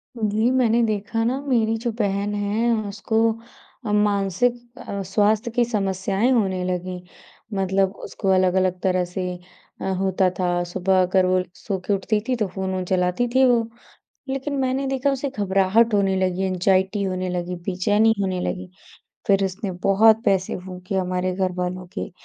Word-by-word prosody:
जी, 220 Hz, +1 st, +1 dB
मैंने 240 Hz, -2 st, +3 dB
देखा 220 Hz, +1 st, -1 dB
ना, 255 Hz, +4 st, 0 dB
मेरी 230 Hz, -5 st, +1 dB
जो 235 Hz, +1 st, -2 dB
बहन 200 Hz, 0 st, 0 dB
है, 210 Hz, +3 st, 0 dB, 0.2 s
उसको 200 Hz, +2 st, -3 dB, 0.8 s
मानसिक 210 Hz, +4 st, 0 dB
अ, 200 Hz, -, -5 dB
स्वास्थ्य 210 Hz, +4 st, +1 dB
की 240 Hz, +1 st, +2 dB
समस्याएँ 195 Hz, +1 st, 0 dB
होने 190 Hz, -6 st, +1 dB
लगीं, 180 Hz, 0 st, -3 dB, 0.6 s
मतलब 195 Hz, 0 st, +1 dB
उसको 195 Hz, -, -3 dB
अलग-अलग 185 Hz, 0 st, +2 dB
तरह 185 Hz, -1 st, +1 dB
से 180 Hz, +1 st, -5 dB, 0.6 s
अ, -, -, -4 dB, 0.2 s
होता 190 Hz, -1 st, +2 dB
था। 175 Hz, -1 st, +1 dB
सुबह 185 Hz, +2 st, +1 dB
अगर 185 Hz, +1 st, +3 dB
वो 185 Hz, 0 st, +2 dB
एक 180 Hz, 0 st, -7 dB
सोके 195 Hz, -1 st, -2 dB
उठती 210 Hz, +2 st, 0 dB
थी, 255 Hz, -, +1 dB
तो 215 Hz, -4 st, -1 dB
फ़ोन-वोन 190 Hz, 0 st, -3 dB
चलाती 180 Hz, +5 st, +1 dB
थी 265 Hz, 0 st, +6 dB
वो। 240 Hz, -2 st, +4 dB, 0.7 s
लेकिन 270 Hz, +2 st, -3 dB
मैंने 265 Hz, +1 st, 0 dB
देखा, 270 Hz, +1 st, +1 dB
उसे 275 Hz, +1 st, -2 dB
घबराहट 200 Hz, +3 st, +3 dB
होने 195 Hz, -2 st, +2 dB
लगी, 185 Hz, 0 st, 0 dB
ऐंगज़ाइटी 190 Hz, +2 st, +1 dB
होने 185 Hz, -1 st, -2 dB
लगी, 180 Hz, 0 st, -3 dB
बेचैनी 205 Hz, +5 st, +2 dB
होने 185 Hz, -2 st, -1 dB
लगी। 185 Hz, 0 st, -4 dB, 0.6 s
फिर 195 Hz, -1 st, +3 dB
उसने 195 Hz, +2 st, -3 dB
बहुत 220 Hz, +3 st, +5 dB
पैसे 190 Hz, -1 st, +1 dB
फूँके 185 Hz, +1 st, -7 dB
हमारे 185 Hz, -1 st, -1 dB
घरवालों 185 Hz, -1 st, -2 dB
के, -, -, -4 dB
195 Hz, 155 wpm, -23 LUFS, 185-225 Hz, 0.8 s, थी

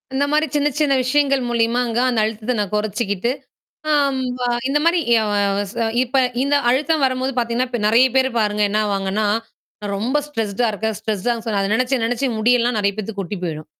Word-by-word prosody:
இந்த 280 Hz, -, +2 dB
மாரி 305 Hz, +1 st, +3 dB
சின்ன 295 Hz, 0 st, +2 dB
சின்ன 290 Hz, -2 st, +2 dB
விஷயங்கள் 275 Hz, +1 st, +2 dB
மூலியமா 235 Hz, +1 st, +1 dB
அங்க 230 Hz, +1 st, -1 dB
அந்த 240 Hz, -, 0 dB
அழுத்தத்த 220 Hz, +3 st, -3 dB
நான் 205 Hz, -3 st, -2 dB
கொறைச்சுக்கிட்டு. 210 Hz, +1 st, -1 dB, 0.6 s
ஆம் 280 Hz, -2 st, +2 dB, 0.2 s
வ -, -, -12 dB, 0.3 s
இந்த 295 Hz, +2 st, +2 dB
மாரி 340 Hz, +1 st, +3 dB, 0.2 s
அ 215 Hz, -, -1 dB, 0.5 s
ச -, -, -16 dB, 0.3 s
இப்ப 255 Hz, +1 st, -6 dB, 0.3 s
இந்த 280 Hz, +1 st, +1 dB, 0.2 s
அழுத்தம் 300 Hz, +4 st, +1 dB
வரம்போது 260 Hz, +1 st, 0 dB
பாத்தீங்கன்னா 240 Hz, +1 st, 0 dB
இப்ப 240 Hz, -, -3 dB
நெறையா 235 Hz, +5 st, +5 dB
பேரு 260 Hz, 0 st, +3 dB
பாருங்க 210 Hz, -1 st, +1 dB
என்னா 215 Hz, +1 st, +1 dB
ஆவாங்கன்னா, 200 Hz, +1 st, -1 dB, 0.5 s
நான் 205 Hz, -1 st, -4 dB
ரொம்ப 255 Hz, +8 st, 0 dB
ஸ்ட்ரெஸ்டா 225 Hz, -3 st, -1 dB
இருக்கேன். 220 Hz, +1 st, -3 dB
ஸ்ட்ரெஸ்டான்னு 220 Hz, +2 st, -2 dB
சொன்னா, 210 Hz, -3 st, 0 dB
அத 195 Hz, -, -1 dB
நெனச்சு 255 Hz, +1 st, 0 dB
நெனச்சு 245 Hz, +3 st, -1 dB
முடி 230 Hz, +3 st, +3 dB
எல்லாம் 240 Hz, 0 st, 0 dB
நெறையா 200 Hz, -1 st, +1 dB
பேத்துக்கு 215 Hz, -1 st, -5 dB
கொட்டி 195 Hz, +2 st, -6 dB
போயிரும். 155 Hz, -2 st, -5 dB
235 Hz, 185 wpm, -20 LUFS, 210-265 Hz, 0.6 s, நெறையா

